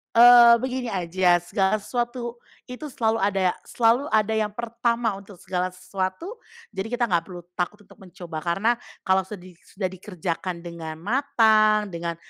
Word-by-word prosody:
Eee, 240 0 +9
begini 255 -1 -3
aja, 180 -2 +1
segala 190 +2 +1
sesuatu 240 +2 -4 0.3
itu 300 +5 -7
selalu 225 -4 0
ada 195 -2 +1 0.2
selalu 240 +4 +2
ada 220 -4 +1
yang 220 -1 +1
pertama 235 +1 -1
untuk 200 -1 -14
segala 180 +1 -3
sesuatu, 195 - -5 0.3
jadi 195 +1 -4
kita 245 +1 -2
nggak 175 -8 +1
perlu 175 -2 -9
takut 185 +4 -4
untuk - - -20
mencoba. 175 -3 -8
Karena 185 +8 +1 0.3
kalau 190 0 +1
sedi 185 -3 -10
sudah 190 -2 -5
dikerjakan 180 -2 -5
dengan 165 -2 -7
matang, 215 -3 +3
dengan 170 0 -4
205 Hz, 145 wpm, -24 LUFS, 180-235 Hz, 0.3 s, Eee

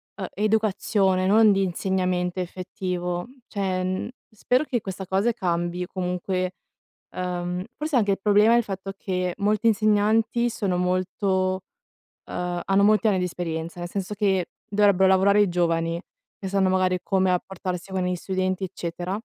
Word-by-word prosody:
ehm, 190 -3 -4
educazione 205 -3 +1
non 215 +2 +6
di 195 0 +2
insegnamento 180 -1 -1
effettivo; 180 -1 -3 0.2
cioè, 190 -3 -1
mhmm, 185 +4 -2 0.2
spero 250 +4 +1
che 245 -5 -1
questa 190 -1 -6
cosa 195 +5 +2
cambi, 175 -4 -2
comunque, 185 0 -2 0.6
ehm, 180 0 -3
forse 305 0 -2
anche 205 -3 +2
il 195 - 0
problema 210 +2 +5
è - - +6
il 240 - +3
fatto 195 -1 -5
che 180 -2 -2
molti 210 +2 +1
insegnanti 220 +2 +2
sono 195 -5 -1
molto, 185 +1 0 0.6
uhm, 180 0 -3
hanno 195 +1 +3
molti 215 +2 +4
anni 200 -3 +3
di 180 - 0
esperienza; 170 -1 -4
nel 175 0 -5
senso 195 +2 -3
che, 195 -4 +1 0.2
dovrebbero 200 -2 +4
lavorare 200 +2 +5
i 205 - +3
giovani, 165 -1 0 0.4
che 195 - -5
sanno 195 -1 +2
magari 185 -1 +2
come 190 -1 +2
rapportarsi 180 0 -3
con 190 -1 -1
gli 180 0 0
studenti 185 +1 -2
eccetera, 180 +1 -4
190 Hz, 150 wpm, -24 LUFS, 180-205 Hz, 0.6 s, non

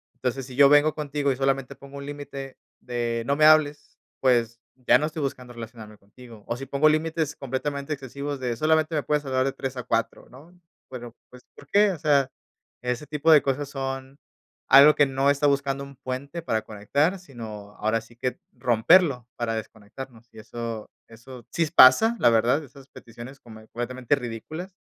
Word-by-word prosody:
Entonces, 130 +1 -3
si 130 - -10
yo 140 +1 +7
vengo 145 +1 +4
contigo 145 -2 -1
y 130 - -1
solamente 135 0 -1
pongo 140 +1 -12
un 140 - -7
límite 140 -2 -8 0.2
de: 120 -1 -2
"No 140 - +2
me 155 - +4
hables", 155 -1 +3 0.2
pues, 120 -3 +1 0.2
ya 125 -1 +4
no 150 - -1
estoy 155 0 -5
buscando 125 -3 -5
relacionarme 110 -2 -10
contigo. 115 +1 -15
O 120 - -3
si 135 - -7
pongo 140 +3 +3
límites 155 0 -1
completamente 140 +2 -4
excesivos 140 +1 -6
de: 125 -2 -2
"Solamente 155 +3 +1
me 150 - 0
puedes 150 0 0
hablar 130 -1 0
de 135 - -1
3 135 -1 -5
a 125 - -4
4", 115 -1 -2
¿no? 165 +8 -17 0.3
Bueno 120 -2 -9
pues, 125 0 -16
¿por 145 - -15
qué? 205 +4 +4
O 170 - -6
sea, 140 -4 +2 0.5
ese 125 +3 -3
tipo 150 +2 +1
de 150 -2 +7
cosas 140 +1 -2
son 135 0 -5 0.5
algo 140 +3 +8
que 145 - +5
no 135 +1 +1
está 140 +1 +1
buscando 140 -1 0
un 140 0 -12
puente 140 +4 -6
para 110 -9 -1
conectar, 140 - -1
sino 110 - -10
ahora 110 +2 0
sí 120 +1 -19
que 125 +1 -4
romperlo 125 +2 +3
para 115 -1 -2
desconectarnos. 110 +3 -9
Y - - -12
eso 115 0 -6 0.2
eso 120 +1 -13
sí 165 -2 0
pasa, 220 - +7
la 120 - +5
verdad, 120 +7 +2
esas 140 0 -15
peticiones 120 +4 -12
como 110 -3 -13
completamente 125 +3 -2
ridículas, 140 - -7
135 Hz, 185 wpm, -25 LUFS, 120-145 Hz, 0.5 s, algo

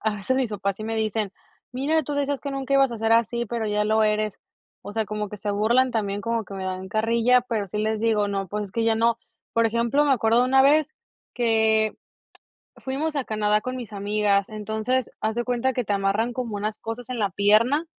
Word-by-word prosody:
a 220 -1 +1
veces 235 +6 -1
mis 255 -4 0
papás 200 -2 -2
sí 215 - -7
me 225 0 -3
dicen: 215 -2 -1 0.4
"Mira, 295 +5 +1
tú 290 - -3
decías 285 -1 -1
que 280 - -5
nunca 275 0 -2
ibas 270 -3 +4
a 230 - -6
ser 225 0 +1
así, 235 +1 +2
pero 230 0 -3
ya 210 0 0
lo 220 +1 +3
eres", 215 -1 0 0.4
o 205 - -8
sea, 220 0 0
como 210 0 -4
que 210 - -8
se 205 +1 -3
burlan 235 +6 +2
también, 205 -3 -2
como 230 +1 -1
que 195 - -10
me 190 -1 -5
dan 185 0 -4
carrilla, 230 +3 +3
pero 225 -5 -2
sí 205 +3 -5
les 215 0 0
digo: 215 -2 +2
"No, 195 -1 -2
pues 210 +3 -4
es 190 - -18
que 230 -1 0
ya 225 -1 +3
no". 230 +1 +2 0.3
Por 230 0 +3
ejemplo, 235 +5 +1
me 285 - +3
acuerdo 225 -1 +3
de 250 - +4
una 265 +1 +4
vez 305 +2 +3 0.4
que 220 -2 +2 0.8
fuimos 295 +4 -3
a 280 - 0
Canadá 210 -1 +1
con 255 0 -4
mis 235 -5 -7
amigas. 200 0 +1
Entonces, 220 +4 -2
haz 220 +1 -1
de 240 - 0
cuenta 250 +1 0
que 250 - -1
te 205 - -1
amarran 200 +5 0
como 235 -4 -4
unas 210 +1 -3
cosas 225 +2 -6
en 245 -2 -3
la 205 - +1
pierna 215 - +3
220 Hz, 230 wpm, -24 LUFS, 210-250 Hz, 0.8 s, ibas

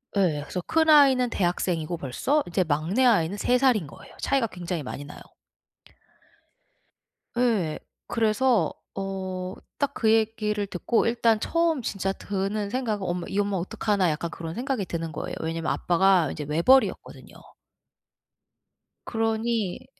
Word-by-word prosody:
예. 170 -7 +2
그래서 180 - -4
큰 320 0 +2
아이는 265 -5 +6
대학생이고 175 -3 -1
벌써 260 - 0
이제 180 +2 +1
막내 165 - 0
아이는 200 -4 +3
3 250 +4 +2
살인 245 - +2
거예요. - - -14
차이가 270 -4 +1
굉장히 175 -4 -5
많이 140 +2 -6
나요. 150 - -11 2.2
예. 210 -11 +1 0.3
그래서 225 - +2 0.2
어 190 -1 -4 0.2
딱 285 - 0
그 220 - +1
얘기를 215 -2 0
듣고 200 +5 0
일단 230 -2 +2
처음 335 -5 +1
진짜 195 -3 -2
드는 200 +1 -3
생각은 220 -5 -2
엄마 175 0 -3
'이 195 - -4
엄마 200 -1 0
어떡하나 190 +1 0
.'약간 155 +2 -3
그런 165 +1 -6
생각이 245 -4 -2
드는 165 -2 -4
거예요. - - -5
왜냐하면 165 0 -2
아빠가 180 -1 +3
인제 150 - -5
외벌이었거든요. 170 - +1 1.7
그러니 225 -1 -1
200 Hz, 300 characters per minute, -26 LUFS, 175-235 Hz, 2.2 s, 아이는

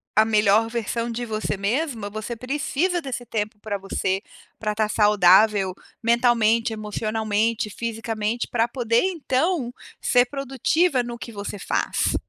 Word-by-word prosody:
a 215 - +7
melhor 215 0 +3
versão 230 0 -2
de 240 +1 -3
você 215 -2 -2
mesma, 225 +1 -1
você 215 +3 -5
precisa 295 +8 -1
desse 255 -4 -5
tempo 215 -1 -3
para 205 -1 -3
você, 190 0 -1 0.4
para 210 -1 -2
tá 215 0 +1
saudável 210 -1 +4 0.3
mentalmente, 230 -1 +3
emocionalmente, 215 +1 -1
fisicamente, 225 +1 -3
pra 230 -1 +1
poder 235 -2 +1
então 320 -5 0 0.3
ser 245 0 +4
produtiva 275 +3 +1
no 240 0 -6
que 235 - -7
você 205 0 -5
faz, - - 0
225 Hz, 130 wpm, -23 LUFS, 210-245 Hz, 0.4 s, a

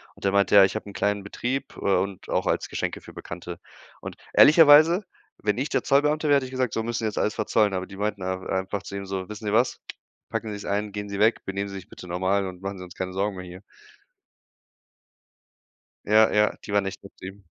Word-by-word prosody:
Und - - -17
der 100 - +2
meinte: 100 0 +2
„Ja, 100 - +10
ich 95 - -3
habe 110 - -5
'n - - -10
kleinen 100 0 -1
Betrieb, 125 +6 -4
äh, - - -9
und 100 -1 -1
auch - - 0
als - - 0
Geschenke - - -3
für - - -13
Bekannte.“ 85 0 -8 0.4
Und - - -8 0.2
ehrlicherweise, 160 +4 +7 0.4
wenn 105 +1 -1
ich 135 +4 -2
der - - 0
Zollbeamte 150 +2 +2
wäre, 145 - +5
hätte 140 -2 +1
ich 130 - -9
gesagt: 130 -3 -1
„So, 115 - -1
müssen 120 +1 -2
sie 115 - -3
jetzt 110 - -3
alles 105 - +1
verzollen“, 105 -1 +1
aber 95 0 -3
die 100 - -11
meinten 105 -1 -2
da 95 0 -2
einfach 95 +1 -3
zu 100 - -8
ihm 100 0 -5
so: 95 -1 -4
„Wissen 105 +1 -8
Sie 105 - -1
was? 120 +3 +2 0.5
Packen 110 - -3
sie's 105 0 -7
ein, 105 +1 -2
gehen 105 0 -6
sie 100 - -4
weg, 110 +2 +3
benehmen 100 +1 -3
sie 100 - -8
sich 95 -2 -9
bitte 90 - -11
normal 95 +3 0
und 90 -1 -9
machen 100 0 -5
sie 90 - -8
uns 90 - -11
keine 95 0 -4
Sorgen 100 +1 -1
mehr 90 0 -7
hier.“ 90 +2 -11 2.5
Ja, 110 +1 +5
ja, 105 0 +2
die 100 - -7
waren 100 -1 +2
echt 95 - -6
nett 100 - -13
zu - - -12
ihm. 95 0 -11
100 Hz, 240 wpm, -25 LUFS, 95-110 Hz, 2.5 s, Ja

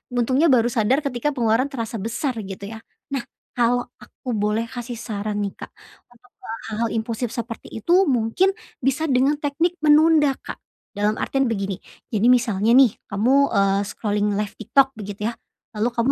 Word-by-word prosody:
untungnya 260 +6 +3
baru 240 -2 +4
sadar 240 +4 +2
ketika 260 +1 -1
pengeluaran 235 +1 +2
terasa 230 -4 -4
besar 240 +6 -2
gitu 200 +1 -7
ya. - - -9 0.3
Nah, 270 - 0 0.3
kalau 245 0 +2 0.2
aku 255 - -8
boleh 210 +2 0
kasih 240 0 -6
saran 210 -2 -3
nih, 200 - -3
Kak, - - -8 0.4
untuk 245 +1 -23
ke - - -13 0.2
hal-hal 225 +1 -1
impulsif 230 +1 -2
seperti 230 -1 -6
itu 345 - +3
mungkin 255 - +2 0.3
bisa 270 +5 +1
dengan 265 +3 +3
teknik 320 +5 0
menunda, 300 -1 +5
Kak. - - -8 0.3
Dalam 210 +1 0
artian 270 +3 0
begini, 195 -4 -2 0.3
jadi 220 +1 +2
misalnya 230 -3 +3
nih 260 -4 +7 0.2
kamu, 255 +8 +3
eee, 195 0 +3
scrolling 210 -1 -1
live 210 0 -2
TikTok 270 +5 +3
begitu 205 -4 -7
ya. 230 - -16 0.3
Lalu 220 +1 0
kamu 235 +2 +1
235 Hz, 165 wpm, -22 LUFS, 210-265 Hz, 0.4 s, nih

